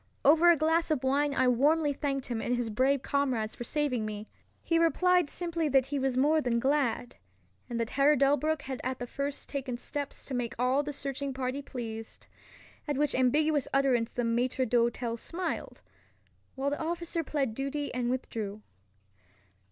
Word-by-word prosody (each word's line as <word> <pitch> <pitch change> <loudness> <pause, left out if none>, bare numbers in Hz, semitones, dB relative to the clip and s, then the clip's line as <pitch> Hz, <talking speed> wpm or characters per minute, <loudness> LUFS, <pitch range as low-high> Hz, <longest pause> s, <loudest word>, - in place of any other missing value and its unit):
Over 320 +5 +7
a 340 - +6
glass 325 +3 +2
of 295 -4 0
wine 280 +2 +2
I 260 - +3
warmly 290 +5 +3
thanked 275 -1 -2
him 235 -2 -3
and 245 - 0
his 240 -2 -2
brave 260 +4 +2
comrades 255 -6 0
for - - -7
saving 270 -3 -1
me. 215 0 -5 0.4
He 330 -1 +2
replied 355 0 +3
simply 335 -2 -2
that 270 -2 +4
he 280 +1 -2
was 265 -1 0
more 305 +4 +4
than 245 -4 0
glad, 265 -2 0 0.5
and 235 -1 -3
that 230 0 -2
Herr 280 +2 +4
Delbruck 290 +2 +2
had 265 -1 -5
at 260 0 -2
the 245 - -4
first 280 +3 -4
taken 265 -3 -4
steps 285 +3 -5
to 275 - -7
make 245 -2 -2
all 255 +3 +2
the 295 0 -4
searching 275 -1 -4
party 260 +1 -2
pleased; 225 -5 -7 0.6
at 290 -2 -1
which 295 0 +1
ambiguous 290 +3 +2
utterance 250 -4 +2
the 245 - -2
maitre 245 +3 +1
d'hotel 235 0 +1
smiled, 350 +9 -5 0.7
while 275 +1 -1
the 290 - -3
officer 335 0 -2
plead 275 -6 -1
duty 275 +4 -3
and 245 -1 -1
withdrew. 215 -5 -4
270 Hz, 175 wpm, -30 LUFS, 245-295 Hz, 0.7 s, Over